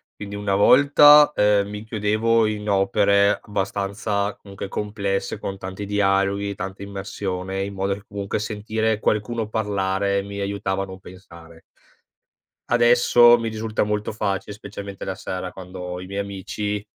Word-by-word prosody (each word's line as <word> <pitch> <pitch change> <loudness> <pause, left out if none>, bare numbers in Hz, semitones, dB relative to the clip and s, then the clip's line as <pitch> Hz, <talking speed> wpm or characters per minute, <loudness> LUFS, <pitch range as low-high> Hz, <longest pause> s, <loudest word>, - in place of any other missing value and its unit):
Quindi 100 0 -7
una 100 -1 -2
volta, 145 +7 +7
ehm, 105 -1 +3
mi 105 +1 -7
chiudevo 110 +1 +1
in 105 -1 -3
opere 100 +1 +3
abbastanza, 100 +1 -2
comunque, 100 -1 -8
complesse, 100 0 -3
con 95 -2 -5
tanti 95 +2 -6
dialoghi, 100 0 +1
tanta 95 +1 -6
immersione, 95 -1 -4
in 100 0 -5
modo 95 0 -1
che, 100 - -13
comunque, 100 -1 -4
sentire 110 +1 -2
qualcuno 110 +1 -1
parlare, 100 -2 0
mi 100 0 -7
aiutava 100 -1 -2
a - - -4
non 95 0 -10
pensare. 85 -3 -14 1.1
Adesso 120 0 +6
mi 115 -1 -3
risulta 110 0 -2
molto 105 0 -2
facile, 100 -2 -3
specialmente 100 -1 -8
la 95 - -2
sera, 95 -1 -5
quando 95 0 -10
ho 90 0 -5
i 90 - -9
miei 100 +1 -4
amici, 100 +1 -4
100 Hz, 145 wpm, -22 LUFS, 95-105 Hz, 1.1 s, volta